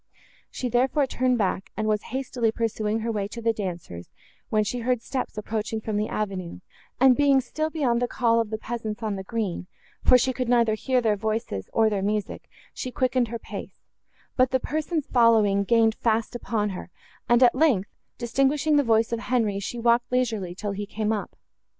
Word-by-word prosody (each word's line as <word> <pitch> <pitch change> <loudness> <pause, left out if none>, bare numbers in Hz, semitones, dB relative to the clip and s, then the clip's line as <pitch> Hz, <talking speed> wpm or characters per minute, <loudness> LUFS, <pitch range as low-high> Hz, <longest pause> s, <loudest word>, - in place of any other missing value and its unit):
She, 255 - -4
therefore, 260 +4 +2
turned 255 -1 +1
back, 195 -2 -1
and 215 0 -1
was 210 -1 +1
hastily 250 -3 -1
pursuing 220 -1 -1
her 230 +1 -1
way 205 -3 -2
to 235 - -8
the 230 0 +1
dancers, 175 - -6 0.4
when 215 -1 +2
she 245 +4 -3
heard 240 0 0
steps 260 -4 -4
approaching 215 +1 -3
from 215 -1 -4
the 210 +1 0
avenue; 190 -4 -4 0.4
and, 260 0 +6
being 280 -1 +4
still 310 +5 -2
beyond 260 -7 0
the 245 - +1
call 230 -1 +2
of 225 - -4
the 220 - -3
peasants 225 -1 -5
on 215 -2 -1
the 190 - -5
green, 190 -4 -3 0.4
for 250 - +7
she 260 +1 +1
could 250 -1 -3
neither 235 -3 +4
hear 255 +3 +1
their 220 -3 +2
voices, 215 - -3
nor 225 -1 +5
their 205 -2 0
music, 210 +1 -3 0.2
she 255 - -5
quickened 250 -1 +1
her 235 +1 -4
pace; - - -9 0.6
but 255 -1 +4
the 260 - +1
persons 310 +2 -2
following 220 -5 +4
gained 225 +1 +3
fast 225 0 0
upon 220 -3 -1
her, 185 - -7 0.4
and, 240 +1 +5
at 240 - +6
length, 255 -9 +2 0.3
distinguishing 275 +5 +2
the 285 - +4
voice 225 -2 +2
of 230 - -1
Henri, 225 -5 0
she 200 +4 -5
walked 235 +1 +2
leisurely, 220 -8 -1
till 205 +2 -4
he 200 +1 -5
came 215 +1 -1
up. 210 - -4
230 Hz, 195 wpm, -25 LUFS, 210-250 Hz, 0.6 s, for